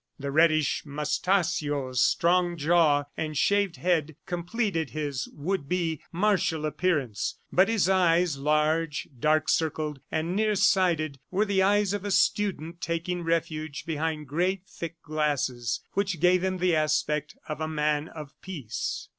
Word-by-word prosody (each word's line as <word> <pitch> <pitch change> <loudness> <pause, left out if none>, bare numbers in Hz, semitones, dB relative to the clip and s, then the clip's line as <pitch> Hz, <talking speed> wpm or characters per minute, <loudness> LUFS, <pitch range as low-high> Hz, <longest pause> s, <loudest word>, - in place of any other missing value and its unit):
The 140 0 -4
reddish 155 -1 +3
moustachios, 150 - 0
strong 175 0 +2
jaw 155 -2 +3
and 155 -2 -3
shaved 200 -1 +2
head 160 -4 0
completed 175 - -2
his 145 -4 -3
would 150 -1 -3
be 170 -4 -1
martial 180 -4 +1
appearance; 150 - -1
but 190 +3 +4
his 220 -6 +2
eyes, 175 -3 +3
large, 150 +2 0
dark 155 +3 +2
circled 155 -2 0
and 165 +3 -1
near 215 0 +2
sighted, 170 -7 +2
were 200 +3 +1
the 200 -2 +1
eyes 205 0 +3
of 205 -2 -3
a 205 - -3
student 175 -4 0
taking 170 +2 -2
refuge 160 -3 -2
behind 160 -1 -2
great 180 +6 -1
thick 165 -2 -8
glasses 140 -7 -1
which 195 -4 -1
gave 180 +2 +4
him 185 0 0
the 180 -2 +2
aspect 150 -1 0
of 155 0 -5
a 155 - -1
man 150 -1 0
of 150 -4 -10
peace. 150 - -5
165 Hz, 140 wpm, -27 LUFS, 150-180 Hz, -, but